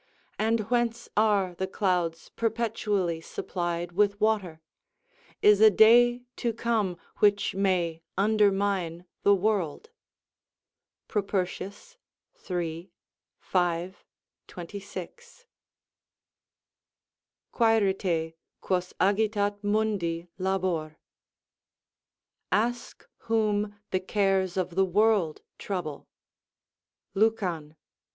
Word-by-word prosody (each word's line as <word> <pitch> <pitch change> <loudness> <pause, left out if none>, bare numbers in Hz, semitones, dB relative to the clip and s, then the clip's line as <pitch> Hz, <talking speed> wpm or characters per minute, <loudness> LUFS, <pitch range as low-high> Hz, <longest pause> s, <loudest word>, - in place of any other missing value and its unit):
and 225 +1 +2
whence 235 -1 0
are 205 -4 +2
the 190 +2 -3
clouds 180 -4 -1
perpetually 215 -7 -1
supplied 175 0 -4
with 205 +2 +1
water? 205 -7 0 0.8
is 210 0 +6
a 220 - +9
day 240 +4 +5
to 235 - -1
come 220 -5 -1 0.2
which 205 -1 +3
may 180 -4 0 0.2
undermine 195 -4 +1 0.2
the 200 - +5
world?" 200 - -1 1.2
Propertius, 200 - -3 0.5
iii. 170 0 -3 0.5
5, 175 +1 -1 0.4
26.] 200 - -9 2.1
"Quaerite, 195 -8 +1 0.3
quos 180 -1 -2
agitat 205 0 +1
mundi 205 -5 0
labor." 185 -5 -1 1.5
["Ask 235 +5 -1 0.2
whom 210 -2 +1 0.2
the 185 - +1
cares 190 -1 0
of 185 -1 -1
the 190 +2 +3
world 195 -4 +2 0.2
trouble" 170 -7 -5 1.1
Lucan, 185 -8 0
i. - - -36
195 Hz, 80 wpm, -27 LUFS, 175-215 Hz, 2.1 s, a